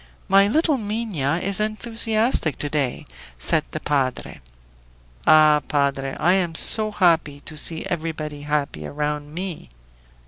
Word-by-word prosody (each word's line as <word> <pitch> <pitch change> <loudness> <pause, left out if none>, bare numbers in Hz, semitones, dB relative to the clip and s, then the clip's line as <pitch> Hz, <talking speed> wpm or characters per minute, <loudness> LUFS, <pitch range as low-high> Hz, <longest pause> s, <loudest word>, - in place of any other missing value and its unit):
"My 195 +1 +4
little 300 +4 +1
Minha 205 -9 -2
is 195 0 -2
enthusiastic 220 - 0
to 145 - -3
day," 140 -5 -2 0.3
said - - +1
the - - -6
padre. 135 -3 -3 0.9
"Ah, 155 -1 +5
padre! 140 -2 -1
I 175 - +3
am 175 -4 -1
so 215 +5 +7
happy 165 -8 +1
to 155 - -8
see 160 +2 -1
everybody 155 -3 -5
happy 145 - -3
around 150 0 -4
me!" 175 - -7
160 Hz, 130 wpm, -21 LUFS, 145-205 Hz, 0.9 s, so